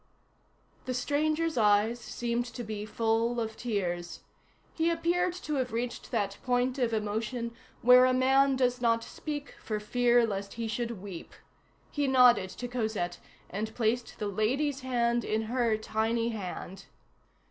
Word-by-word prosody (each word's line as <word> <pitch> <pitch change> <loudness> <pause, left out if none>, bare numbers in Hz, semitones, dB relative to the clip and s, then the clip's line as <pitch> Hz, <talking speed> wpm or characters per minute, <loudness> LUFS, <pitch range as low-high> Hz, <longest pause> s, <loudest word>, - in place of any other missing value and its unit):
The 255 - -2
stranger's 310 +3 0
eyes 210 +2 +3
seemed 240 +1 -2
to 245 - -4
be 215 -1 -5
full 230 +2 +1
of 220 -1 -3
tears. 175 -7 -3 0.5
He 325 0 +1
appeared 345 +2 +1
to 300 -1 -2
have 255 -1 -1
reached 235 +2 -3
that 200 -4 -1
point 250 +1 0
of 240 -2 +1
emotion 220 +2 -2 0.3
where 250 +1 +8
a 255 - +4
man 265 +2 +4
does 250 -1 +1
not 230 -1 +2
speak 290 +1 -6
for 215 -1 -2
fear 240 +2 +3
lest 200 -2 -4
he 230 -1 -3
should 230 -2 -3
weep. 190 -4 -8 0.6
He 290 -2 0
nodded 250 -7 +5
to 245 +6 -6
Cosette, 220 -7 -2 0.3
and 215 +3 -4
placed 235 +1 -1
the 210 - -3
"lady's" 260 +8 0
hand 240 -2 +1
in 220 +1 -1
her 230 -1 +1
tiny 225 +2 0
hand. 195 -3 -6
235 Hz, 145 wpm, -29 LUFS, 215-255 Hz, 0.6 s, where